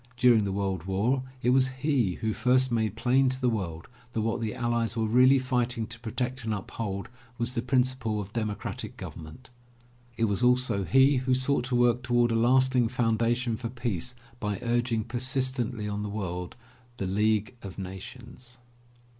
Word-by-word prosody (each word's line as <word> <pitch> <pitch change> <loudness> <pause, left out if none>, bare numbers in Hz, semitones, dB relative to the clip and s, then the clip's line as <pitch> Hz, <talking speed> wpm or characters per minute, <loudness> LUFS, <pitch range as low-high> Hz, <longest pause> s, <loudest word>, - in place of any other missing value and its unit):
During 120 -4 +5
the 100 - -2
World 95 -3 -2
War 105 +8 +1 0.2
it 125 - +4
was 130 0 +4
he 130 - 0
who 110 -1 0
first 130 +3 +2
made 110 -3 0
plain 130 +3 +3
to 130 0 -4
the 125 -2 +2
world 85 -7 -4 0.3
that 110 - 0
what 115 +2 -1
the 110 -2 -2
allies 120 -1 -1
were 110 - +1
really 125 +5 +5
fighting 125 -3 0
to 115 +1 -8
protect 125 +3 -3
and 110 -1 -1
uphold 100 0 -5 0.3
was 120 +1 -1
the 120 - -1
principle 125 -3 0
of 105 0 -7
democratic 110 -3 -4
government. 80 +12 -10 0.7
It 115 - +2
was 100 0 -1
also 125 -5 +2
he 135 +5 +5
who 130 0 +1
sought 130 0 +1
to 125 0 -1
work 120 0 +3
toward 120 -1 +2
a - - +1
lasting 125 +1 +4
foundation 115 0 +1
for 115 0 -4
peace 120 -2 -3 0.2
by 105 -2 -2
urging 120 -1 0
persistent 125 0 -1
ly 105 -1 -3
on 105 0 -3
the 105 - -3
world 90 -4 -4 0.4
the 100 - -2
League 105 +3 +1
of 95 - -9
Nations. 120 +6 -9
120 Hz, 175 wpm, -28 LUFS, 105-125 Hz, 0.7 s, During